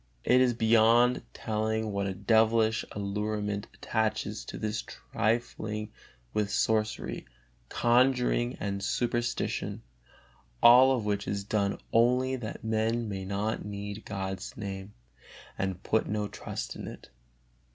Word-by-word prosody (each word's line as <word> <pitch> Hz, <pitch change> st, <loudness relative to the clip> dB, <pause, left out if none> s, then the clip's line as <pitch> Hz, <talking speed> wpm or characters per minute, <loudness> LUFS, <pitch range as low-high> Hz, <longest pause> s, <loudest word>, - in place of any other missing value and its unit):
It 125 Hz, +1 st, +5 dB
is 125 Hz, -2 st, +3 dB
beyond 115 Hz, +2 st, +4 dB
telling 110 Hz, 0 st, -2 dB
what 100 Hz, 0 st, -1 dB
a 95 Hz, -, -3 dB
devilish 110 Hz, +2 st, +3 dB
allurement 105 Hz, 0 st, -2 dB
attaches 110 Hz, -2 st, -1 dB
to -, -, -7 dB
this 110 Hz, 0 st, -2 dB
trifling 110 Hz, -1 st, -2 dB, 0.4 s
with 105 Hz, -1 st, 0 dB
sorcery, 110 Hz, -, 0 dB, 0.4 s
conjuring 125 Hz, 0 st, +2 dB
and 100 Hz, -1 st, -3 dB
superstition, 120 Hz, +3 st, -1 dB, 0.8 s
all 125 Hz, +3 st, +8 dB
of 110 Hz, -, -4 dB
which 105 Hz, -1 st, -1 dB
is 100 Hz, 0 st, -2 dB
done 100 Hz, -1 st, 0 dB, 0.2 s
only 125 Hz, +3 st, +3 dB
that 115 Hz, -3 st, -7 dB
men 110 Hz, +1 st, 0 dB
may 95 Hz, -2 st, -4 dB
not 100 Hz, +3 st, -2 dB
need 100 Hz, +1 st, -6 dB
God's 95 Hz, -1 st, -5 dB
Name 100 Hz, -1 st, -6 dB, 0.6 s
and 95 Hz, -2 st, -3 dB
put 110 Hz, -, +1 dB
no 105 Hz, -1 st, -1 dB
trust -, -, -6 dB
in -, -, -7 dB
it. -, -, -10 dB
110 Hz, 120 wpm, -29 LUFS, 100-115 Hz, 0.8 s, all